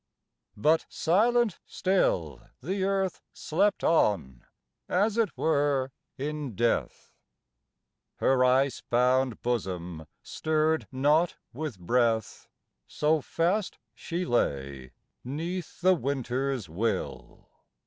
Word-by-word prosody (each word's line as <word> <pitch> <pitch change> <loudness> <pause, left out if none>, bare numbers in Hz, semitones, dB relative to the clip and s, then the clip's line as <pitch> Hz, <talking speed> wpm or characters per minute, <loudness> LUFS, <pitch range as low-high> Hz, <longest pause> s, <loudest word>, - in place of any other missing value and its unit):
But 155 +9 +2
silent 220 +5 +2
still 95 - 0 0.2
The 190 - -2
Earth 195 -2 -1
slept 200 +6 0
on, 85 - +1 0.5
as 205 +4 +2
it 230 -5 0
were 140 -4 +1 0.3
in 145 -4 -4
death. 120 +2 -1 1.0
Her 130 -1 +3
ice 130 +1 +2
bound 125 0 +1
bosom 90 -9 -3 0.2
stirred 155 0 0
not 150 +6 +2 0.2
with 145 -4 -5
breath, 115 +4 0 0.4
So 155 +1 +1
fast 180 +8 -1 0.2
she 175 +2 -4
lay 70 - -1 0.3
'neath 165 +8 -5
the 185 +1 +5
winter's 135 - -2
will. 100 +9 -4
140 Hz, 95 wpm, -28 LUFS, 120-170 Hz, 1.0 s, the